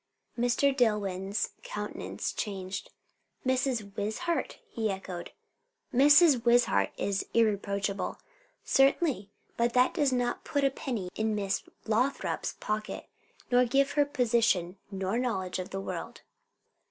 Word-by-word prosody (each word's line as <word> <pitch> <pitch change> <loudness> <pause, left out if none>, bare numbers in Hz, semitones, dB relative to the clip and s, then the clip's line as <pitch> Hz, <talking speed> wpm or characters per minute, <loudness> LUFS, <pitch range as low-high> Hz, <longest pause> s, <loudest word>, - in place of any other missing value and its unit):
Mr. 245 +3 +2
Dillwyn's 205 -4 0
countenance - - -4
changed. 190 -3 -4 0.6
"Mrs. 255 -6 0
Wishart!" 220 +13 -2
he 225 - -2
echoed. 190 -3 -5 0.6
"Mrs. 290 0 +6
Wishart 235 - +4
is 195 -1 -1
irreproachable." 200 -3 0 0.5
"Certainly, 270 - +3 0.3
but 235 0 +1
that 250 +1 +4
does 290 -5 +2
not 245 -1 -1
put 285 -1 -1
a 275 - +4
penny 230 -9 -4
in 220 0 0
Miss 200 -2 -1 0.2
Lothrop's 245 +6 0
pocket, 215 0 -4 0.4
nor 245 0 +6
give 275 +3 +2
her 290 - +4
position, 230 -9 +2
nor 195 +3 -2
knowledge 190 -8 -2
of 185 - -5
the 195 - -4
world." 195 - -6
230 Hz, 115 wpm, -29 LUFS, 200-260 Hz, 0.6 s, Mrs